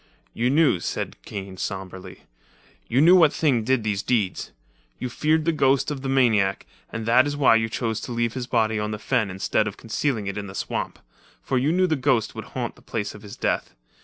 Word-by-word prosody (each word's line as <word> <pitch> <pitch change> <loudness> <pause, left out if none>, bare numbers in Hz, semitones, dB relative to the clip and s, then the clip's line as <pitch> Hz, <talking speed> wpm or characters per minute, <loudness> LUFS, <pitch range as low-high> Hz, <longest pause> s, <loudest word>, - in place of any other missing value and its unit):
"You 120 +2 0
knew," 145 - +3
said - - -4
Kane 95 -2 -7
sombrely, 95 -1 -6 0.6
"you 125 +4 +2
knew 175 +4 +7
what 160 -5 +6
things 130 -10 +1
did 130 -3 +2
these 105 -2 -1
deeds. 105 -7 -1 0.5
You 125 - -4
feared 155 +5 +1
the 165 - +3
ghost 135 -2 +2
of 140 -2 -4
the 135 - -3
maniac, 110 -7 +2 0.3
and 110 0 -4
that 125 +4 +5
is 145 0 -3
why 140 -5 +5
you 115 0 -1
chose 110 -1 -2
to - - -6
leave 115 -1 0
his 125 -2 -4
body 110 -3 +1
on 105 0 -2
the 105 - -3
fen 110 -1 0
instead 95 +3 0
of 105 - -5
concealing 115 -1 -2
it 100 +1 -3
in 100 - -6
the 95 - -9
swamp. - - -3 0.5
For 130 - 0
you 140 +5 +1
knew 185 +2 +3
the 160 -3 +1
ghost 130 -5 +1
would - - -7
haunt - - -5
the - - -18
place 105 -2 -4
of 105 - -12
his 105 +1 -10
death. - - -1
115 Hz, 220 wpm, -24 LUFS, 105-135 Hz, 0.6 s, knew